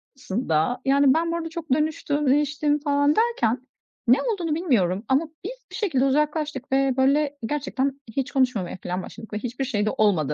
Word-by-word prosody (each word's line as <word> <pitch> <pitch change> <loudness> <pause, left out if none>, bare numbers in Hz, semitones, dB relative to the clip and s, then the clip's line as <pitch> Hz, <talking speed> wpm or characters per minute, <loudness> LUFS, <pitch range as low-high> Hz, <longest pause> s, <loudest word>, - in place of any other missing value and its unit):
sonrasında, 225 -1 -1
yani, 275 0 +5
ben 335 +1 0
bu - - -1
arada 325 -1 -4
çok 325 -4 -7
dönüştüm, 300 -1 0
değiştim 295 +1 +2
falan 285 0 +2
derken 260 - +1 0.4
ne 250 +3 +6
olduğunu 355 -10 -1
bilmiyorum 215 - +1
ama 280 +5 +2 0.2
biz - - -7
bir - - -7
şekilde 310 - +1
uzaklaştık 295 -1 0
ve 270 -1 +2
böyle 285 +2 +2
gerçekten 275 0 -2 0.2
hiç 270 - -1
konuşmamaya 250 -10 0
filan 180 +1 -2
başladık 220 -1 -11
ve - - -1
hiçbir 250 +3 -3
şey 210 -5 -1
de 215 - +2
olmadı 170 -9 +2
275 Hz, 175 wpm, -24 LUFS, 245-300 Hz, 0.4 s, ne